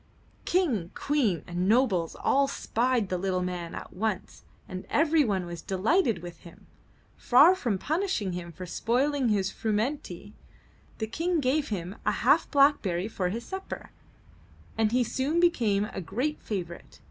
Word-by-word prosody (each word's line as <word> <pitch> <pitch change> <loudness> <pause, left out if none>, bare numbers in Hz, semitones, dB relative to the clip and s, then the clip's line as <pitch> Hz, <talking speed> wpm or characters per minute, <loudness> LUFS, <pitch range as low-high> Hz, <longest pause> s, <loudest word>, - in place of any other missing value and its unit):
King, 260 - +1
Queen 255 - 0
and 180 +2 -1
nobles 210 -9 +2
all 275 0 +2
spied 245 -5 0
the 180 - -1
little 185 -1 -1
man 180 -2 -4
at - - -8
once 205 -1 -3 0.2
and 185 0 -7
everyone 295 - +2
was 170 -1 -7
delighted 220 - +1
with 175 -1 -9
him. 170 - -15 0.5
Far 285 +9 +6
from 240 - -1
punishing 310 - -1
him 175 -1 -6
for 180 +3 -8
spoiling 255 +8 0
his 195 -3 +1
frumenty, 215 - -3 0.6
the 220 - -2
King 330 +9 -1
gave 285 +2 +1
him 190 -1 -4
a - - +2
half - - +3
blackberry 250 - +3
for 185 -5 -2
his 230 +5 -5
supper, 380 0 -7 0.8
and 220 -1 +1
he 250 +1 +3
soon 275 +7 -1
became 230 - +2
a 205 -2 -6
great 255 - -2
favorite. 175 -5 -6
220 Hz, 145 wpm, -28 LUFS, 185-280 Hz, 0.8 s, Far